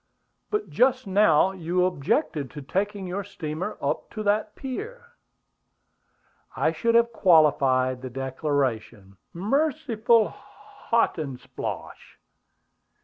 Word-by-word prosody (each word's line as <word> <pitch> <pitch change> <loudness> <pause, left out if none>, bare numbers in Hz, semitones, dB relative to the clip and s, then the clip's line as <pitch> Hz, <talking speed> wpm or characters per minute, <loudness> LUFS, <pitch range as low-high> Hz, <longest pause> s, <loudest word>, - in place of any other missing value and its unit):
"But 420 0 -2
just 255 +1 +2
now 190 -3 +4
you 180 0 0
objected 155 - -1
to 145 - -9
taking 200 +6 -2
your 185 +3 -3
steamer 180 0 -5
up - - -2
to 215 - -4
that 210 +1 0
pier." 470 - -7 1.4
"I - - +1
should 230 -1 0
have 235 0 +4
qualified 135 - +3
the 130 - -6
declaration 130 -6 -3
" - - -51 0.2
"Merciful 245 -6 +2 0.6
Hotandsplosh!" 155 - -3
185 Hz, 100 wpm, -25 LUFS, 145-230 Hz, 1.4 s, now